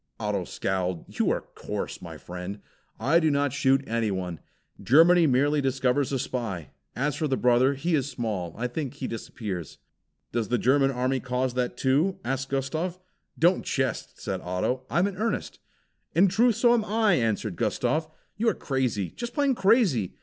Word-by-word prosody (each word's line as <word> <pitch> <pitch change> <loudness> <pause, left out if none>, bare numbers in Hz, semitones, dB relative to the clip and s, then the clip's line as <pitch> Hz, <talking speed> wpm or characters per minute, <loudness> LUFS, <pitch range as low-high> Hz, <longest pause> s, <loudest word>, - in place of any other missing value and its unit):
Otto 105 -4 -1
scowled. 90 -2 -2
"You - - +3
are - - 0
coarse, - - -5
my - - -8
friend," 90 +2 -6
he 100 - -20 0.4
said. 115 - -6
"I 165 +5 +5
do 160 -2 +2
not 140 -2 +1
shoot 135 -1 +3
anyone. 95 -7 -2 0.4
Germany 165 +5 +6
merely 145 +3 +3
destroys 135 0 +1
a 135 - +1
spy. 115 - -4 0.2
As 140 +2 0
for 155 +1 -1
the 135 -2 0
brother, 125 +3 +3
he 165 +6 -1
is 140 -3 +1
small, 105 - -3
I 115 - -2
think 130 +2 -3
he - - -5
disappears." 100 - -6 0.5
"Does 115 -2 -1
the 120 - +1
German 135 +3 +3
army 130 0 0
cause 125 0 -1
that 125 -1 -2
too?" 150 +9 +2
asked 135 0 -2
Gustav. 155 +7 -2 0.4
"Don't 175 +3 +3
jest," 130 -1 -2
said - - -3
Otto. 90 +9 -2
"I - - -1
am 175 - +4
in 200 -2 -3
earnest." 225 +2 -2 0.6
"In 190 +4 +6
truth, 225 +5 +3
so 240 +2 +4
am 235 -2 +2
I!" 215 -1 +2
answered 110 - 0
Gustav. 150 - 0 0.3
"You 225 +2 +3
are - - -1
crazy, 125 -9 -1
just 240 0 -6
plain 285 -2 +3
crazy. 195 - +2
130 Hz, 180 wpm, -26 LUFS, 115-160 Hz, 0.6 s, Germany